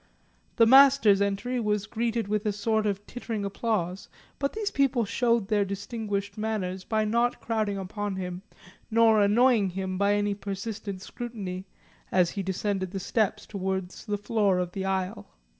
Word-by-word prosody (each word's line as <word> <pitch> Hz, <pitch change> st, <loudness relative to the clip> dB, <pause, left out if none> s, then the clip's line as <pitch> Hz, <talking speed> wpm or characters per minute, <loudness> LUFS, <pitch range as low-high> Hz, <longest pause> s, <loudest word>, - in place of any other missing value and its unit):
The 230 Hz, -, +6 dB
Master's 265 Hz, -5 st, +7 dB
entry 200 Hz, +5 st, 0 dB
was 210 Hz, -2 st, 0 dB
greeted 230 Hz, 0 st, -1 dB
with 210 Hz, +1 st, -1 dB
a -, -, +2 dB
sort 215 Hz, +1 st, 0 dB
of 200 Hz, 0 st, -2 dB
tittering 225 Hz, -4 st, -4 dB
applause, 200 Hz, -3 st, -2 dB, 0.3 s
but 280 Hz, 0 st, -1 dB
these 430 Hz, -1 st, -2 dB
people 270 Hz, -4 st, +2 dB
showed 230 Hz, -1 st, +1 dB
their 210 Hz, -1 st, +2 dB
distinguished 200 Hz, +1 st, -4 dB
manners 190 Hz, -4 st, -2 dB
by 215 Hz, +1 st, 0 dB
not 235 Hz, +3 st, +1 dB
crowding 215 Hz, -3 st, -1 dB
upon 200 Hz, +1 st, -4 dB
him 180 Hz, -1 st, -5 dB, 0.5 s
nor 225 Hz, -1 st, +5 dB
annoying 215 Hz, 0 st, +4 dB
him 185 Hz, 0 st, -4 dB
by 200 Hz, 0 st, +3 dB
any 205 Hz, 0 st, +1 dB
persistent 200 Hz, -1 st, -5 dB
scrutiny, 195 Hz, -5 st, -6 dB, 0.4 s
as 180 Hz, -2 st, +3 dB
he 200 Hz, -, -3 dB
descended 190 Hz, 0 st, -2 dB
the 195 Hz, +1 st, -4 dB
steps 210 Hz, +2 st, 0 dB
towards 190 Hz, -2 st, -4 dB
the 205 Hz, -1 st, 0 dB
floor 205 Hz, -2 st, +1 dB
of 180 Hz, -1 st, -1 dB
the 190 Hz, +1 st, -4 dB
aisle. 190 Hz, -, -2 dB
205 Hz, 160 wpm, -27 LUFS, 190-225 Hz, 0.5 s, Master's